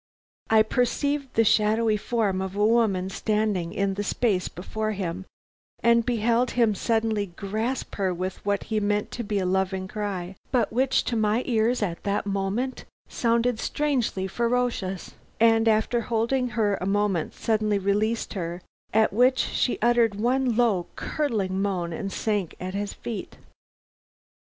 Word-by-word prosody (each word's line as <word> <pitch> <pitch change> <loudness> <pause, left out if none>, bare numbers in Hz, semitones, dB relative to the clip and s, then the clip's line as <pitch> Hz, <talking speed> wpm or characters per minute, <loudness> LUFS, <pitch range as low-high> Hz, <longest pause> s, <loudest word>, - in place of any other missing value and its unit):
"I 220 -1 +6
perceived 270 +4 -1
the 225 - +5
shadowy 215 +1 +3
form 210 -3 0
of 190 0 -4
a 205 +1 +2
woman 210 -5 +2
standing 210 -6 0
in 195 +1 0
the 205 +1 -3
space 205 -4 0
before 215 +4 -4
him, 185 -1 -4 0.6
and 235 0 +5
beheld 235 +1 +1
him 230 -3 +4
suddenly 220 0 0
grasp 215 +8 -3
her 195 -2 +1
with 185 +2 -4
what 200 0 0
he 220 -1 -1
meant 205 0 0
to 240 - -4
be 205 -1 -2
a 190 - 0
loving 190 0 0
cry, 195 -3 -4 0.2
but 240 -4 +1
which 260 +2 +2
to 240 - -2
my 220 +2 +1
ears 230 -1 +1
at 170 -4 -3
that 200 0 -1
moment 200 +6 -2 0.2
sounded 235 0 +1
strangely 255 -11 -1
ferocious, 235 -4 -1 0.3
and 225 0 +4
after 220 +2 +2
holding 235 +3 0
her 205 -3 +2
a 185 - -2
moment 195 -4 0
suddenly 215 -2 +1
release 210 +4 0
her, 175 -2 -4 0.3
at 220 -2 +4
which 250 +4 +4
she 250 - 0
uttered 235 -3 +3
one 245 +3 +1
low, 215 -8 +2
curdling 200 -11 -1
moan 180 -4 -1
and 195 +4 -4
sank 205 -6 -1
at 185 +1 -5
his 200 0 -2
feet. 230 -3 -7
215 Hz, 150 wpm, -25 LUFS, 195-235 Hz, 0.6 s, I